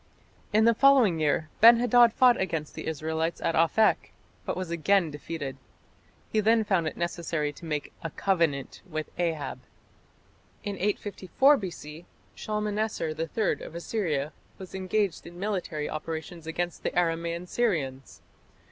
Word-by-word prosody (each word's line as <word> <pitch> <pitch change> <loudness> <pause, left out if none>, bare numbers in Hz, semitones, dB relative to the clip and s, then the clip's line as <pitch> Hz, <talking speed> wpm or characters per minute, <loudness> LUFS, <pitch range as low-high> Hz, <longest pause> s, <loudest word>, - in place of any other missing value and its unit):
In 215 +1 +4
the 230 - +6
following 245 -9 +5
year 155 +1 +1
Ben 230 +1 +9
hadad 245 -1 +5
fought 245 -1 +4
against 165 -5 -3
the - - -7
Israelites 160 +1 -2
at - - 0
Aphek, 165 +7 +2 0.3
but - - -2
was 185 -2 -4
again 170 0 +2
defeated. 145 -2 -6 0.7
He 215 - +2
then 220 +1 +4
found 190 -6 +1
it - - -5
necessary 165 -3 -2
to 170 - -12
make 150 -2 -3
"a 165 - -4
covenant" 165 -6 -1
with 155 -1 -4
Ahab. 165 -4 -2 1.0
In 205 -2 -3
854 205 - +2
B.C. 170 - -7 0.3
Shalmaneser 210 -3 -2
III 165 +7 -1
of 165 - -9
Assyria 160 -6 -2 0.2
was 190 -2 -10
engaged 190 -1 -1
in 175 0 -11
military 180 -7 -2
operations 160 +1 -6
against 175 +2 -3
the - - -1
Aramaean 170 0 0
Syrians. 150 - -2
170 Hz, 140 wpm, -27 LUFS, 160-210 Hz, 1.0 s, Ben